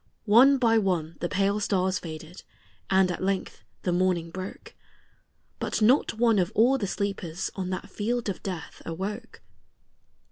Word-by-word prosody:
One 250 +6 +6
by 225 -3 +4
one 170 -5 -1
the 175 - -2
pale 200 +2 +1
stars 190 -2 0
faded, 160 +1 -9 0.5
and 190 -1 +4
at 175 - -5
length 195 0 -2 0.2
the 180 - 0
morning 175 -2 +1
broke; 185 +2 -8 0.9
But - - -2
not 230 +2 +3
one 225 -2 +3
of 180 - 0
all 255 +5 +4
the 200 - -2
sleepers 190 -4 -3
on 185 -2 -4
that 185 - -4
field 235 +3 -2
of 195 - -3
death 180 -4 -6
awoke. 190 +5 -6
190 Hz, 150 wpm, -27 LUFS, 180-215 Hz, 0.9 s, One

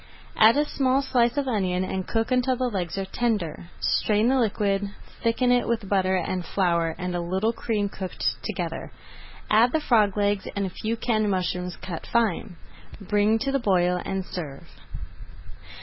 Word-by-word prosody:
Add 225 +4 +6
a 295 - +3
small 270 -1 +1
slice 240 -1 +2
of 280 -1 0
onion 185 -6 0
and 185 0 -3
cook 225 +2 -1
until 255 0 +2
the 250 -1 -1
legs 180 -3 -3
are 195 - -2
tender. 200 -7 -2
Strain 215 +2 +2
the 265 0 +3
liquid, 200 -3 0 0.3
thicken 245 +2 +2
it 245 0 +3
with 230 -3 -1
butter 190 -1 +2
and 185 0 -1
flour 170 -3 0
and 180 -1 -3
a 175 - -1
little 190 +6 0
cream 215 -3 -1
cooked 190 -2 -3
together. - - -4 0.6
Add 225 +3 +5
the 315 - +3
frog 215 -8 +2
legs 205 -1 +1
and 200 -1 0
a 190 - -4
few 220 +5 -3
canned 215 -3 +1
mushrooms 180 -1 -1
cut 170 -3 -7
fine. 220 -4 0 0.4
Bring 210 +2 +2
to 275 +5 -1
the 275 - +1
boil 180 -5 +2
and 190 -1 -3
serve. 150 -8 -7
205 Hz, 170 wpm, -25 LUFS, 185-235 Hz, 0.6 s, Add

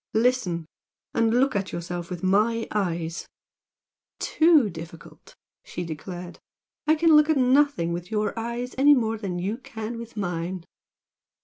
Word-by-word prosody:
Listen! 220 -8 +1 0.5
and 225 -1 +2
look 255 +1 +2
at 195 -1 -1
yourself 175 0 -5
with 180 -1 -6
MY 215 +4 +2
eyes 170 -5 -2 0.5
" - - -68 0.2
"Too 315 -7 +6
difficult!" 165 -1 -11 0.3
she 175 - -6
declared 175 +2 -7 0.5
"I 310 - +5
can 320 0 +5
look 300 +1 +6
at 315 - +3
nothing 260 - +3
with 175 +1 -5
your 215 -1 -1
eyes 235 +2 -4
any 290 +2 +7
more 225 -3 -1
than 190 -4 -3
you 200 +7 -3
can 230 -2 -6
with 235 -1 -10
mine!" 175 -2 -3
215 Hz, 145 wpm, -25 LUFS, 175-250 Hz, 0.5 s, any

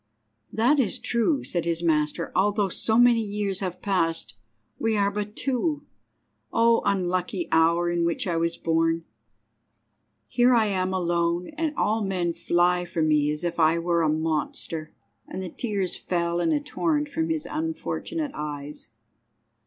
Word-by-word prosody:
"That 245 +7 +3
is 230 -8 +1
true," 240 +5 0
said 175 -2 -1
his 170 0 -1
master. 150 -2 0
"Although 205 +1 +2
so 220 +5 +1
many 240 -1 +5
years 205 -2 -2
have 185 -2 -5
passed, 165 -5 0 0.5
we 225 -1 +1
are 200 0 +2
but 210 +1 -4
two. 290 +3 -1 0.7
O 230 0 +4
unlucky 180 -1 0
hour 170 +2 +3
in 175 0 0
which 170 0 0
I 175 -3 -1
was 170 +1 0
born! 165 0 +1 1.2
Here 245 - +4
am 190 -5 +1
I - - +1
alone, 170 0 0
and 310 0 -3
all 215 +1 +1
men 180 -3 -1
fly 175 +1 +2
from 170 -3 -1
me 150 -1 +3
as 150 +2 -3
if 175 0 -2
I 160 +1 +4
were 170 0 +1
a 160 - +2
monster," 155 0 -2 0.4
and 190 - -5
the 185 - -5
tears 195 -2 -2
fell 170 -1 -1
in 320 - +1
a 300 - +2
torrent 295 +1 -1
from 320 +3 -2
his 320 -2 -1
unfortunate 320 -1 -3
eyes. 150 -1 -6
185 Hz, 155 wpm, -25 LUFS, 170-225 Hz, 1.2 s, many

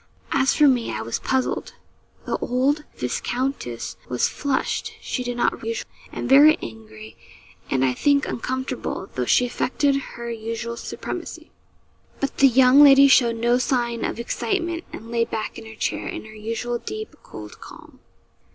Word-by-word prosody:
As 270 -1 +2
for 300 - +6
me, 250 -4 +2
I 110 - -4
was 115 - -3
puzzled. 265 -1 -1 0.5
The - - -1
old 275 +5 0
viscountess 180 - -3
was 125 - +1
flushed 280 -2 -2
(she 250 - -3
did 245 0 -4
not - - 0
rouge), 230 0 -3 0.3
and - - -4
very 290 +3 +7
angry, 110 -1 -10 0.5
and, 135 0 +2
I 130 - +1
think, 280 - +2
uncomfortable, 255 -5 -4
though 125 - -1
she 250 - +4
affected 275 +3 0 0.2
her 235 0 -5
usual 230 +1 -4
supremacy. - - -7 0.7
But 275 - -3
the 275 - +7
young 260 +2 +6
lady 275 -1 +8
showed 240 -4 +5
no 240 +2 +2
sign 240 -3 0
of - - -3
excitement, 340 - -2
and 230 +1 -9
lay 235 -1 +2
back 220 -2 -4
in 225 - -11
her 220 - -11
chair - - -2
in - - -6
her 215 - -12
usual 230 +3 -3
deep, 435 - -6
cold 105 -1 -11
calm. - - -13
240 Hz, 160 wpm, -23 LUFS, 220-275 Hz, 0.7 s, lady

